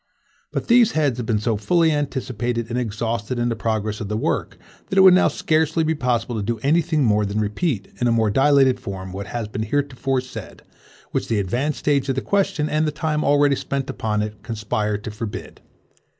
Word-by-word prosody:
But - - -3
these 240 -2 +5
heads 145 -5 +1
have 115 - -4
been 110 - +2
so 110 +1 0
fully 165 - +2
anticipated 125 -5 -2
and 125 - 0
exhausted 115 +1 -2
in 120 0 0
the 115 - -1
progress 110 -1 -2
of 105 - -3
the 105 +1 -2
work, - - -2 0.3
that 190 - -3
it - - +8
would 190 -1 +9
now 185 - +5
scarcely 160 +1 +1
be 160 +1 +1
possible 125 -5 -1
to - - -1
do 115 +3 -2
any 155 +5 +4
thing 155 -3 0
more 105 -3 +3
than 100 +1 -2
repeat, 105 - -1
in 120 - +3
a - - +3
more 110 -2 +2
dilated 135 +1 +4
form, 95 -1 -6
what 100 +2 -6
has 115 0 -4
been 110 - -5
heretofore 135 +2 -1
said, 130 - -10 0.5
which - - -2
the 115 - 0
advanced 120 +10 -1
stage 140 -2 +1
of 135 - +1
the 130 - -1
question, 195 -7 0
and 155 +1 +1
the - - 0
time 150 +1 -1
already 145 -1 +4
spent 135 0 -3
upon 105 -1 -1
it, 105 0 -7
conspire 105 -2 -2
to 105 +1 -7
forbid. 105 0 -7
120 Hz, 210 wpm, -22 LUFS, 110-145 Hz, 0.5 s, would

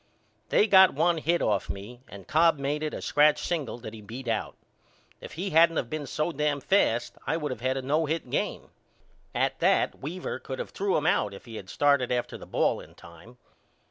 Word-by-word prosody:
They - - +4
got 190 -6 +6
one 165 +2 +2
hit 170 +3 +1
off 105 -3 0
me 110 +6 -7
and 100 -2 -11
Cobb 165 0 +4
made 140 +2 -2
it 155 -1 -2
a - - -6
scratch 150 0 +4
single 155 -9 -2
that 115 -2 -9
he 110 - -10
beat 120 +5 -9
out. 110 -2 -2 0.6
If - - -10
he 185 +4 -4
hadn't 165 +1 +5
of 120 - -2
been 155 -2 -4
so 155 +5 -1
dam 150 -1 0
fast 125 - +1
I 160 - +1
would 150 -4 -3
of 120 -3 -6
had 130 +1 0
a 135 - -4
no 150 +4 +1
hit 160 -2 -2
game. - - -2 0.6
At - - 0
that - - +2
Weaver 175 +6 -5
could 130 -1 -7
of - - -5
threw 195 0 0
him 150 - -2
out 105 - +1
if - - -13
he 115 -2 -8
had 95 - -10
started 140 -4 +2
after 125 -1 -1
the - - -10
ball - - +1
in - - -14
time. 85 +9 -15
145 Hz, 215 wpm, -27 LUFS, 120-160 Hz, 0.6 s, got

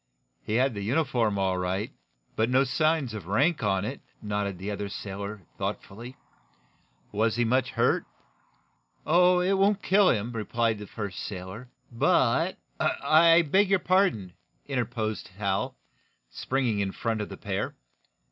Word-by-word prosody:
"He 110 - -3
had 130 +1 +2
the 100 - -5
uniform, 120 -3 +1
all 95 -1 0
right 95 +3 -2 0.4
but 110 +2 +1
no 130 +2 +4
signs 145 -1 +1
of 105 -6 -7
rank 140 - +2
on 95 -2 +1
it," 135 +5 -5 0.2
nodded 105 -2 -3
the 95 +3 -5
other 100 0 -4
sailor, 100 0 -6 0.2
thoughtfully. 120 +6 -5 0.9
"Was 110 +2 +1
he 120 0 +1
much 130 +2 +1
hurt?" 130 - +1 1.0
"Oh, 180 +2 +4
it 185 +2 +2
won't 200 +1 +2
kill 200 0 +4
him," 115 +1 0
replied 115 -1 -1
the 105 - -8
first 100 -4 -6
sailor. 95 +5 -7 0.2
"But 115 - +2
" - - -40 0.3
"I 165 +1 +7
beg 190 +6 +3
your 195 - +5
pardon," 180 - +1 0.3
interposed 120 -5 -2
Hal, 100 -2 -1 0.5
springing 125 - -1
in 95 -1 -1
front 115 -2 -2
of 105 - -5
the - - -8
pair. - - -3
115 Hz, 145 wpm, -27 LUFS, 100-140 Hz, 1.0 s, I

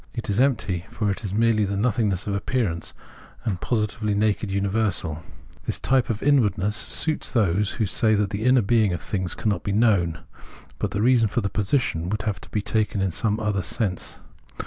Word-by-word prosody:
It 115 -3 -3
is 100 - 0
empty, 100 -10 +1
for 105 -3 -1
it 100 - -4
is 100 - -3
merely 110 +1 +3
the 100 0 -1
nothing 110 0 +1
ness 95 -2 -2
of 100 - -2
appearance, 100 -5 -2 0.5
and 95 -6 -2
positively 110 -2 -1
the - - 0
naked 105 -1 +1
universal. 100 -5 -1 0.5
This - - 0
type 130 -4 +1
of 110 -2 -2
inwardness 105 -8 +2
suits 155 +6 -1
those 105 -4 +1
who 110 - 0
say 110 +2 +2
that 100 -1 0
the 105 +2 -3
inner 125 -1 +4
being 110 -2 +3
of 85 - -4
things 95 -3 -2
cannot 105 -5 -1
be 100 - -3
known 95 -7 +2 0.3
;* - - -21
but - - -1
the 100 - -1
reason 120 -2 +4
for 120 +4 -1
the 100 - -1
position 100 - 0
would 105 +2 -2
have 105 -5 -2
to - - -12
be 105 - -2
taken 110 -1 0
in 95 -1 0
some 105 +5 0
other 105 -3 0
sense. 95 -2 -2
105 Hz, 205 wpm, -24 LUFS, 100-115 Hz, 0.5 s, inner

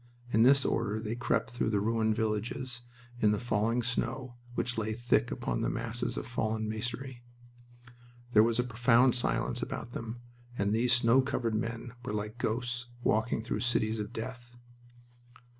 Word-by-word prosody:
In 110 - +5
this 135 +3 +6
order 110 -2 0
they 110 0 -3
crept 120 -1 0
through 120 -2 -1
the 105 -2 +2
ruined 110 +1 +1
villages 115 +3 -2 0.4
in 105 - +4
the 105 -1 +1
falling 115 +1 +1
snow, 125 +1 -2 0.2
which 125 0 -1
lay 110 -1 -1
thick 120 +2 +1
upon - - -2
the - - +1
masses 115 +1 -2
of - - -3
fallen 110 -2 -1
masonry. 120 +3 -4 1.1
There 105 - +8
was 115 +1 +3
a 125 - +3
profound 125 +1 +4
silence 120 - +1
about 120 - -5
them, 115 0 -6 0.4
and 100 +1 +1
these 120 +2 +2
snow 125 +1 +5
covered 120 -3 -1
men 115 +2 -3
were 120 - -4
like 105 +2 -4
ghosts 120 +1 -1 0.2
walking 110 +1 +1
through 115 - -2
cities 110 -2 +1
of 105 +1 -4
death. 120 +1 -7
115 Hz, 160 wpm, -31 LUFS, 110-120 Hz, 1.1 s, There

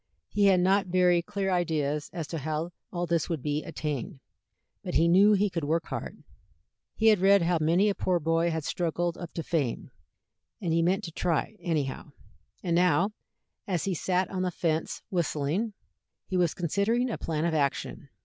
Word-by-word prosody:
He 205 -1 +2
had 190 -2 +5
not 190 +2 +3
very 180 -1 +3
clear 195 +1 -2
ideas 155 -5 0
as 170 -3 -4
to 165 - -3
how 155 +3 -3 0.2
all 175 0 -2
this 170 -1 0
was 165 - 0
to 130 - -16
be 150 0 -1
attained, 150 -5 -4 0.6
but - - -4
he 165 - +4
knew 195 +5 +6
he 205 +1 +3
could 170 -5 -3
work 160 +3 0
hard; - - -6 0.7
he 220 0 +4
had 210 -3 +4
read 195 0 +5
how 170 0 +2
many 170 +6 +3
a 205 - +2
poor 180 -2 0
boy 165 +2 +1
had 160 -2 -2
struggled 175 +2 -1
up 175 -2 -8
to 165 - -4
fame, 150 -9 -2 0.7
and 170 -3 -1
he 165 - +3
meant 180 +3 +1
to 165 - -6
try, 170 +5 -1
anyhow. 150 -3 -3 0.5
And 170 -2 +1
now, 180 +3 +3 0.6
as 180 -5 -1
he 195 - -1
sat 185 +2 0
on 185 -1 -2
the 185 - +1
fence 165 -2 -2
whistling, 175 +4 -1 0.5
he 185 - -4
was 175 -3 +2
considering 205 +8 0
a - - -4
plan 160 0 -2
of 170 - 0
action. 140 -1 -1
170 Hz, 190 wpm, -28 LUFS, 160-185 Hz, 0.7 s, knew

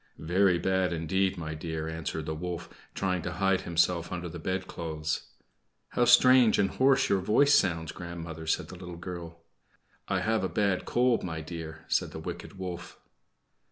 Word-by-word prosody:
"Very 90 +3 +3
bad 95 -1 +1
indeed, 95 +4 0
my 80 -2 -4
dear," 80 0 -4
answered 80 -1 -4
the 80 - -2
wolf, 90 +2 -5 0.3
trying 90 -2 0
to 90 +1 -4
hide 95 +1 +2
himself 85 0 +1
under 90 -1 -4
the 85 +1 -7
bedclothes. 80 -4 -3 0.6
"How 120 - +2
strange 125 -1 +7
and 95 -1 +2
hoarse 135 +1 +3
your 95 -1 +2
voice 140 +10 +4
sounds, 80 - +2
grandmother," 85 -2 -7
said - - 0
the 90 - -9
little 90 -1 -8
girl. 85 -2 -8 0.6
"I - - 0
have 110 0 +1
got - - 0
a - - -13
bad 100 -3 +1
cold, 120 -1 +2
my 80 -3 -4
dear," 80 -1 -8
said - - 0
the - - -6
wicked - - -7
wolf. 90 -2 -6
90 Hz, 170 wpm, -29 LUFS, 80-95 Hz, 0.6 s, strange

